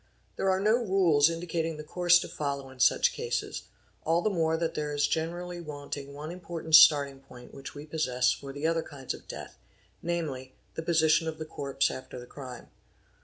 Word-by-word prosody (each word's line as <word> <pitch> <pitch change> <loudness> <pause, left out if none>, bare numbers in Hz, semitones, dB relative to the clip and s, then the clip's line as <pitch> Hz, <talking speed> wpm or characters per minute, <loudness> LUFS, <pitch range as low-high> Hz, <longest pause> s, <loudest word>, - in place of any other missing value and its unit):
| - - -38
There 195 - 0
are 190 0 +2
no 215 +4 +3
rules 175 -7 +4
indicating 165 -1 -3
the 150 - -7
course 175 +2 +4
to - - -5
follow 140 -2 -4
in 130 - -16
such - - +4
cases; - - -3 0.4
al 165 +2 +2
the 215 - +2
more 160 -3 +1
that 165 0 -1
there 150 -1 -3
is 145 0 +3
generally 175 +3 -3
wanting 145 -2 -7
one 150 +3 -7
important 170 -2 -7
starting 140 -3 +7
poir 125 -1 -13
which 135 - -9
we 145 +1 -8
possess 130 -6 +1
for 140 +1 -5
the 145 +3 -5
other 165 0 +2
kinds 140 -5 -6
of - - -12
death, - - -9 0.4
namely, 150 -7 -3 0.2
the - - -4
position 160 -1 +3
of 160 -1 -4
th 155 - -6
corpse 135 0 0
after 130 - -8
the 120 - -9
crime. 125 -1 -10
155 Hz, 195 wpm, -29 LUFS, 140-170 Hz, 0.4 s, starting